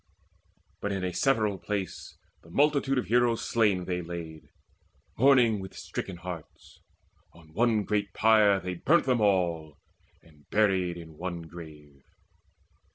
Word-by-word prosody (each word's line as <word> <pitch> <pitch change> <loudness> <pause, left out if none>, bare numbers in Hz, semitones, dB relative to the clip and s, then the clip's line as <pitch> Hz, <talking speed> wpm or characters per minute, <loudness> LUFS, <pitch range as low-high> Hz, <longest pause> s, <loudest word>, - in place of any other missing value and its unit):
But 100 - -2
in 95 -1 -3
a 90 -1 -2
several 110 -5 +1
place 100 -4 -5 0.2
The 80 - -18
multitude 140 - +2
of 125 - 0
heroes 120 0 +1
slain 105 -6 +2
they 90 -1 -2
laid, 85 -2 -8 0.7
Mourning 125 -4 +4
with 95 -1 -9
stricken 95 -3 -6
hearts. 85 -3 -10 0.5
On 80 -2 -18
one 110 +1 +2
great 100 0 -1
pyre 110 -3 +4
They 90 -1 -4
burnt 155 - +2
them 125 -3 +1
all, 85 -7 0 0.5
and 75 -3 -23
buried 95 -5 +1
in 80 -2 -12
one 85 -1 -4
grave. 75 -4 -13
95 Hz, 135 wpm, -28 LUFS, 85-110 Hz, 0.7 s, Mourning